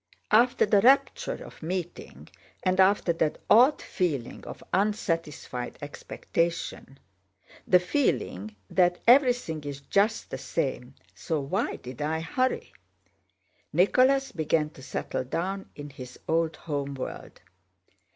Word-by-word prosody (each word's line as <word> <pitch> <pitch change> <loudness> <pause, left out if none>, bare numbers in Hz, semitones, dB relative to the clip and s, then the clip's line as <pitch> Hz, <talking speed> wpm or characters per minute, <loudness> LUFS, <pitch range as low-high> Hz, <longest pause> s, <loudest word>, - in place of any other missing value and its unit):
After 240 +3 +5
the 205 -1 +4
rapture 265 +5 +3
of - - -14
meeting, 175 +1 -5 0.4
and 185 0 +1
after 190 -2 +4
that 160 -2 0
odd 255 +7 +6
feeling 145 -10 -2
of - - -9
unsatisfied 165 - -2
expectation—the 140 - -3
feeling 140 - -1
that 175 - +2
"everything 245 - +4
is 140 -1 -6
just 205 +9 0
the - - -4
same, 130 -4 -3 0.2
so 105 - -2
why 140 0 -1
did 125 +2 -9
I 160 +2 -1
hurry?"—Nicholas 255 +3 -1
began 155 -2 0
to 135 - -14
settle 130 - -3
down 190 +9 -3
in 145 0 -8
his 130 -2 -10
old 165 0 +1
home 140 -3 -4
world. 130 - -7
165 Hz, 110 wpm, -27 LUFS, 140-200 Hz, 0.4 s, odd